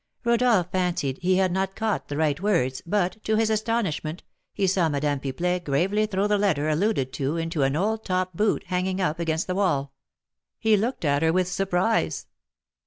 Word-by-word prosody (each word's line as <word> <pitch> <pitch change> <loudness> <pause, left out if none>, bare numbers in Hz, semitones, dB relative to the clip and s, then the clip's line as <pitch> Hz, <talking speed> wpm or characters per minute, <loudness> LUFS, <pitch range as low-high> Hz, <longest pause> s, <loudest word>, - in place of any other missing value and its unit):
Rodolph 235 -6 +2
fancied 175 -8 -1
he 185 +1 +2
had 190 -1 +2
not 190 +1 -1
caught 220 -2 -2
the 145 - -4
right 155 -1 +1
words, 165 -11 +1
but, 205 +2 -1
to 220 - +1
his 220 0 +2
astonishment, 210 -8 -1 0.3
he 200 - -1
saw 180 -3 +2
Madame 145 -1 0
Pipelet 175 +7 -2
gravely 190 +9 +1
throw 195 -1 0
the 210 0 +2
letter 160 -8 +1
alluded 155 -5 0
to 140 +4 -2
into 165 -1 -2
an 135 +1 +2
old 215 +6 0
top 185 -1 -1
boot 210 +4 +1
hanging 185 +1 -1
up 165 -3 0
against 160 -1 -1
the 185 - -2
wall. 145 -8 0 0.6
He 220 -1 +3
looked 220 -2 -1
at 145 0 +2
her 160 0 +3
with 180 +1 +1
surprise. 190 +3 0
180 Hz, 180 wpm, -25 LUFS, 155-205 Hz, 0.6 s, He